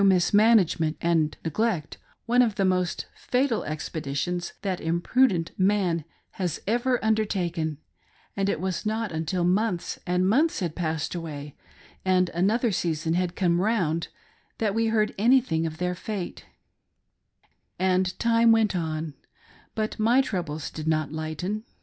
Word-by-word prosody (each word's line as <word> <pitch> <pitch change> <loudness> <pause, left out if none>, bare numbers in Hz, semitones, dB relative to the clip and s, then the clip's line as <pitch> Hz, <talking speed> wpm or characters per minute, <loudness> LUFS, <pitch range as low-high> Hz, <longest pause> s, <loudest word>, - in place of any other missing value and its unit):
mismanagement 190 -3 +4
and 165 -3 +1
neglect, 170 -1 -1 0.3
one 245 +1 +4
of 225 -4 +2
the 195 -2 +1
most 185 -1 0
fatal 250 -2 0
expeditions 155 +2 -3
that 190 -3 -2
imprudent 170 +2 +2
man 185 -4 +2 0.3
has 180 -4 -3
ever 245 +4 +1
undertaken; 180 -8 0 0.6
and 195 0 0
it - - -1
was 185 0 -2
not 220 -1 -1
until 160 +3 -1
months 185 0 0
and 180 +1 +2
months 295 +11 +2
had 170 -4 -2
passed 160 -2 -2
away, 150 -4 -6 0.5
and 185 -1 +3
another 215 +7 +1
season 165 -3 -1
had 180 0 0
come 175 -2 +2
round 180 -7 0 0.5
that 215 -3 0
we 225 +1 +1
heard 215 -1 +1
anything 220 -9 +3
of 160 0 -7
their 180 +1 -1
fate; 190 0 -5 1.3
And 185 0 +1
time 230 0 +4
went 220 -3 +3
on, 160 -2 -3 0.6
but 215 0 -2
my 235 +5 +4
troubles 165 - -4
did 155 0 -6
not 155 -2 +1
lighten. 160 +7 -3
180 Hz, 135 wpm, -26 LUFS, 165-215 Hz, 1.3 s, mismanagement